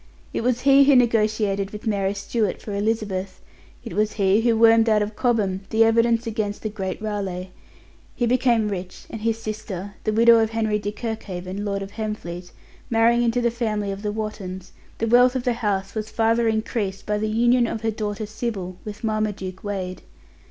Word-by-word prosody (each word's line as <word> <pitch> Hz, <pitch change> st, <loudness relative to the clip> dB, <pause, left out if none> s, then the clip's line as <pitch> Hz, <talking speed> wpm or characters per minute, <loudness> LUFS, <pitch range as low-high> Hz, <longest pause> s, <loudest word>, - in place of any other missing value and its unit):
It -, -, -1 dB
was 245 Hz, +1 st, 0 dB
he 275 Hz, 0 st, +6 dB
who 280 Hz, 0 st, +6 dB
negotiated 215 Hz, -4 st, +2 dB
with 210 Hz, 0 st, -9 dB
Mary 200 Hz, -2 st, 0 dB
Stuart 205 Hz, 0 st, -1 dB
for 210 Hz, -, -7 dB
Elizabeth; 200 Hz, -2 st, -2 dB, 0.4 s
it -, -, -7 dB
was 210 Hz, +2 st, +1 dB
he 200 Hz, +1 st, +3 dB
who 230 Hz, -1 st, +2 dB
wormed 225 Hz, 0 st, +6 dB
out 210 Hz, -1 st, +4 dB
of 210 Hz, +1 st, -6 dB
Cobham 205 Hz, -7 st, +1 dB
the 225 Hz, +1 st, +4 dB
evidence 230 Hz, +1 st, +3 dB
against 215 Hz, -2 st, -3 dB
the 215 Hz, -, -1 dB
great 190 Hz, -3 st, -4 dB
Raleigh. 195 Hz, -4 st, -4 dB, 0.6 s
He 240 Hz, -, 0 dB
became 235 Hz, -3 st, +2 dB
rich, 185 Hz, -2 st, -6 dB
and 225 Hz, -, -6 dB
his 225 Hz, 0 st, 0 dB
sister 210 Hz, -3 st, -6 dB
(the 215 Hz, -, 0 dB
widow 230 Hz, +1 st, +6 dB
of 220 Hz, -1 st, +2 dB
Henry 220 Hz, -2 st, 0 dB
de 205 Hz, 0 st, -3 dB
Kirkhaven, 205 Hz, -4 st, -5 dB
Lord 200 Hz, -1 st, -2 dB
of 195 Hz, -, -9 dB
Hemfleet) 185 Hz, -5 st, -5 dB, 0.4 s
marrying 235 Hz, +1 st, +4 dB
into 240 Hz, +1 st, +1 dB
the 235 Hz, -1 st, +2 dB
family 215 Hz, -4 st, -2 dB
of 195 Hz, +1 st, -6 dB
the 210 Hz, -1 st, -2 dB
Wottons, 205 Hz, -4 st, -5 dB, 0.3 s
the 230 Hz, -, -1 dB
wealth 245 Hz, +2 st, +5 dB
of 255 Hz, -, -1 dB
the 245 Hz, -, +1 dB
house 205 Hz, -4 st, -2 dB
was 215 Hz, -1 st, -4 dB
further 230 Hz, +1 st, +2 dB
increased 220 Hz, -3 st, -2 dB
by 210 Hz, 0 st, 0 dB
the 215 Hz, 0 st, -1 dB
union 240 Hz, +2 st, +3 dB
of 220 Hz, -, -4 dB
her 225 Hz, -1 st, 0 dB
daughter 210 Hz, 0 st, -3 dB
Sybil 205 Hz, -4 st, -4 dB
with 210 Hz, +2 st, -8 dB
Marmaduke 210 Hz, -4 st, -2 dB
Wade. 190 Hz, -3 st, -4 dB
215 Hz, 185 wpm, -23 LUFS, 200-230 Hz, 0.6 s, he